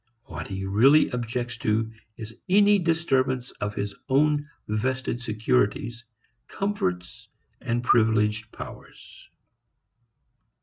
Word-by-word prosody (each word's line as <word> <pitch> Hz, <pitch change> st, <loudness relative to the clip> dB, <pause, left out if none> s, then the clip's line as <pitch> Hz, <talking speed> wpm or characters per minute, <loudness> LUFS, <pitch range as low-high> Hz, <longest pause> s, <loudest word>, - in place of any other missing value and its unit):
What 135 Hz, -, -7 dB
he 95 Hz, -1 st, -5 dB
really 125 Hz, +10 st, +5 dB
objects 120 Hz, 0 st, -3 dB
to 110 Hz, 0 st, 0 dB, 0.3 s
is 110 Hz, -1 st, -8 dB
any 205 Hz, +1 st, +5 dB
disturbance 135 Hz, -7 st, 0 dB
of 105 Hz, 0 st, -2 dB
his 100 Hz, -1 st, -3 dB, 0.2 s
own 145 Hz, +2 st, +2 dB, 0.2 s
vested 125 Hz, +3 st, -2 dB
securities, 110 Hz, -, 0 dB, 0.4 s
comforts 110 Hz, -, -3 dB, 0.3 s
and 120 Hz, -1 st, -1 dB
privileged 110 Hz, -2 st, +2 dB
powers. -, -, -12 dB
120 Hz, 95 wpm, -25 LUFS, 105-135 Hz, 0.4 s, really